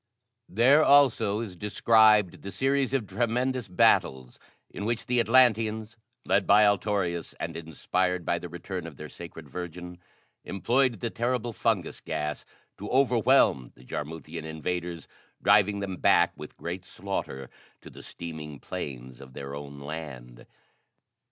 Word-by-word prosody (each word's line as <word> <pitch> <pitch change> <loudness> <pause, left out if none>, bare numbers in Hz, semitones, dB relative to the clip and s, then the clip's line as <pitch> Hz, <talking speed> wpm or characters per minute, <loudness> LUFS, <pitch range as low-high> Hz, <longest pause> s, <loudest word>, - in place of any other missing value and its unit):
There, 130 +9 +5
also, 130 -8 +4
is 105 -6 -6
described 105 0 +3
the 100 - -7
series 135 +6 +1
of 135 -5 0
tremendous 125 +2 -1
battles 65 -8 +2 0.3
in 100 - -6
which 115 +1 -2
the 125 0 +1
Atlanteans, 115 -2 +3 0.3
led 95 0 +2
by 105 +1 +6
Altorius 100 -4 0
and - - -4
inspired 90 +2 -2
by 85 - 0
the 90 - -8
return 90 0 -6
of 75 -5 -11
their 75 0 -8
Sacred 85 -3 -10
Virgin, 90 +3 -7 0.4
employed 120 +2 0
the 115 - -2
terrible 120 0 -1
fungus - - -1
gas 75 0 -3 0.3
to 105 - -6
overwhelm 120 - +3
the 60 - -17
Jarmuthian 80 +3 -6
invaders, 85 +2 -4 0.3
driving 100 0 +3
them 95 -2 -4
back - - +4
with - - -11
great 85 +2 -5
slaughter 90 -10 -5 0.3
to - - -12
the - - -12
steaming 80 -4 -8
plains 65 0 -7
of 65 -1 -13
their 70 0 -7
own 70 0 -8
land. 70 -5 -8
95 Hz, 140 wpm, -27 LUFS, 80-115 Hz, 0.4 s, by